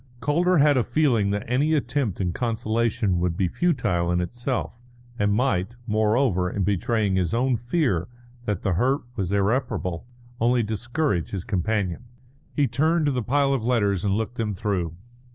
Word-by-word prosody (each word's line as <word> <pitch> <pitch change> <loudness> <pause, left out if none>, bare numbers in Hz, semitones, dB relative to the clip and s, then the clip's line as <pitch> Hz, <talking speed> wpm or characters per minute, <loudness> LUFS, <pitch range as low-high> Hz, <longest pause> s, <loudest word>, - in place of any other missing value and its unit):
Calder 175 +6 +2
had 145 -1 +5
a 125 - +3
feeling 120 -7 +2
that 100 +1 -1
any 145 +6 +2
attempt 130 - -1
at 90 -3 -1
consolation 115 -3 0
would 85 -1 -1
be 95 - +2
futile 90 - 0
in 90 - +1
itself, 120 +5 -3 0.4
and 105 0 +2
might, 115 -1 0
moreover, 110 -3 +2
in 100 - -2
betraying 105 0 +1
his 90 +2 0
own 125 +1 +2
fear 120 - 0 0.4
that 105 -4 -2
the 95 - +1
hurt 130 +10 +1
was 95 -4 -2
irreparable, 100 -3 -1 0.3
only 120 +1 +3
discourage 110 - -1
his 95 -3 -4
companion. 100 0 -1 0.5
He 145 -2 +3
turned 155 +7 +1
to 145 - +2
the 125 -2 -1
pile 140 +4 +2
of 130 -5 -1
letters 105 -6 +1
and 100 -1 +1
looked 110 +3 -3
them 105 -3 -1
through. 90 -5 -2
110 Hz, 165 wpm, -24 LUFS, 95-130 Hz, 0.5 s, had